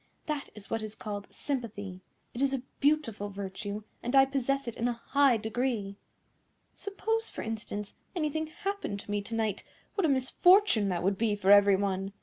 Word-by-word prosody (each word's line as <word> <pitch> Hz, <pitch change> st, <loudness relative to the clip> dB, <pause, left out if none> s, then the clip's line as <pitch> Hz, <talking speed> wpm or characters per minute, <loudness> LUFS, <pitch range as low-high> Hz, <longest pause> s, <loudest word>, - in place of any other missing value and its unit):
That 300 Hz, -3 st, -3 dB
is 210 Hz, -1 st, -10 dB
what 225 Hz, -, 0 dB
is 215 Hz, 0 st, -6 dB
called 205 Hz, -2 st, -5 dB
sympathy. 205 Hz, -9 st, -4 dB, 0.3 s
It 240 Hz, -, -4 dB
is 275 Hz, -1 st, +3 dB
a 255 Hz, -, -5 dB, 0.2 s
beautiful 275 Hz, -9 st, +1 dB
virtue, 200 Hz, +1 st, -5 dB, 0.2 s
and 245 Hz, +3 st, -1 dB
I 270 Hz, 0 st, +8 dB
possess 275 Hz, 0 st, -1 dB
it 235 Hz, -, -4 dB
in 235 Hz, -, 0 dB
a 245 Hz, -, +1 dB
high 270 Hz, +1 st, +3 dB
degree. 220 Hz, -2 st, -2 dB, 0.8 s
Suppose, 445 Hz, +3 st, -2 dB
for -, -, -6 dB
instance, 210 Hz, -2 st, -5 dB, 0.2 s
anything 315 Hz, -1 st, -1 dB
happened 395 Hz, -, -4 dB
to -, -, -8 dB
me 205 Hz, 0 st, 0 dB
to 225 Hz, +3 st, -5 dB
night, 215 Hz, -3 st, -1 dB, 0.3 s
what 395 Hz, -, +1 dB
a -, -, +3 dB
misfortune 270 Hz, -, +5 dB
that 175 Hz, -2 st, -1 dB
would 195 Hz, +1 st, +1 dB
be 220 Hz, -2 st, +2 dB
for 200 Hz, -1 st, +3 dB
every 205 Hz, -1 st, +8 dB
one! 195 Hz, 0 st, -1 dB
225 Hz, 180 wpm, -30 LUFS, 205-275 Hz, 0.8 s, I